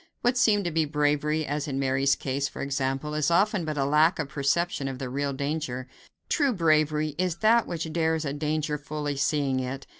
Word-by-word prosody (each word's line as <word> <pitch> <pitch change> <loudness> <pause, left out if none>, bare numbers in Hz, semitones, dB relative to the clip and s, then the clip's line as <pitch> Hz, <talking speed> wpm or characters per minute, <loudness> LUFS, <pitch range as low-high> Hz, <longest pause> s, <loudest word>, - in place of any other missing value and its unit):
What 245 +1 +2
seems 215 -5 +3
to 175 - -2
be 160 0 +1
bravery, 150 +1 0
as 145 0 -3
in 135 -2 -3
Mary's 135 0 +2
case, 140 +1 -2
for - - -6
example, 135 +2 -2
is 150 0 +1
often 195 +1 +2
but 155 -1 -3
a 135 - +1
lack 155 +4 +4
of 150 -4 -3
perception 140 +1 0
of 135 -1 -4
the 130 -1 -5
real 140 +1 -1
danger. 140 -2 -3 0.4
True 285 -5 +2
bravery 155 -4 +2
is 180 -2 0
that 230 +1 +4
which 165 -2 -4
dares 160 -1 0
a 140 - -2
danger 150 0 -2
fully 150 0 -4
seeing 140 -2 0
it. 130 +1 -4
150 Hz, 200 wpm, -26 LUFS, 140-160 Hz, 0.4 s, lack